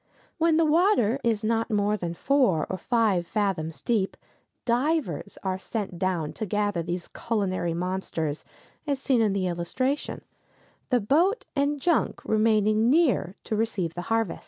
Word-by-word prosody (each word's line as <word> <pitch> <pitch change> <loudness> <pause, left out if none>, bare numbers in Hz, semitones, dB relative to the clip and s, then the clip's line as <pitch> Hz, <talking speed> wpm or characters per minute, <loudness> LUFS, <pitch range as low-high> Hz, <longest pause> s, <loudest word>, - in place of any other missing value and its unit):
When 325 -1 +3
the 330 - +4
water 305 - +3
is 225 -3 +1
not 225 +1 0
more 210 -1 +1
than 170 -4 -4
four 250 - +2
or 185 - -2
five 210 -6 +1
fathoms 165 -8 -2
deep, 210 -5 0 0.5
divers 245 - 0
are 190 -1 -1
sent 195 -4 -4
down 180 -5 -1
to 215 - -1
gather 205 -2 0
these 175 +1 -4
culinary 185 -7 -1
monsters, 170 -4 -3 0.4
as 285 -1 +1
seen 265 -3 +2
in 210 -3 +2
the 195 -2 0
illustration, 185 +11 -2 0.7
the 250 -2 +3
boat 335 - +2
and 285 +1 +1
junk 335 +3 +1
remaining 215 0 +3
near 265 - +2
to 220 - -2
receive 210 -7 -1
the 175 - -5
harvest. 225 -4 0
215 Hz, 150 wpm, -26 LUFS, 185-255 Hz, 0.7 s, the